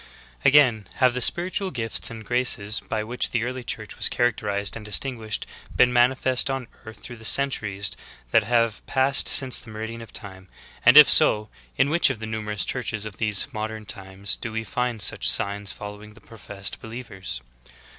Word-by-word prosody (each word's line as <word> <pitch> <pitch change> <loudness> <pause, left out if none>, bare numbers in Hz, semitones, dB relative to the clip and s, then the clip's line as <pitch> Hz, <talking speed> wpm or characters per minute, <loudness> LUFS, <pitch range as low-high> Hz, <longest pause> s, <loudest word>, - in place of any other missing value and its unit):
3. - - +5
Again, 125 -7 +3
have 130 -2 +2
the 125 - -3
spiritual 185 - +1
gifts 115 -7 -1
and 110 -1 -10
graces 115 -3 0
by 110 -1 -4
which 120 +3 -1
the 120 -1 -1
early 125 +1 -5
Church - - -6
was - - +3
characterized 105 -4 -1
and 110 - -8
distinguished 110 0 -1 0.3
been 125 0 +3
man 120 +1 +4
ifest 130 0 0
on 135 -2 -4 0.2
earth 110 0 -11
through 120 - -10
the 110 - -15
centuries 105 -6 +2 0.4
that 115 - +4
have 115 -1 0
passed 135 +1 +3
since 130 -2 +5
the - - -11
meridian 110 +2 -7
of 115 - -12
time; 95 -3 -8 0.3
and 125 +4 +6
if 150 - +11
so, 110 -8 +5 0.3
in 140 - +2
which 170 -2 +3
of 130 - -3
the 110 - -7
numerous 105 -2 -4
churches 110 -4 -4
of 100 -3 -8
these 105 -3 +1
modern 110 0 -6
times 95 -1 -6
do 115 - -6
we 110 0 -4
find 120 -2 -2
such - - 0
signs 100 0 0
fol 105 -1 -8
lowing 105 +1 -14
the - - -16
professed 105 -3 -5
believers? 110 - -7
110 Hz, 185 wpm, -23 LUFS, 105-125 Hz, 0.4 s, if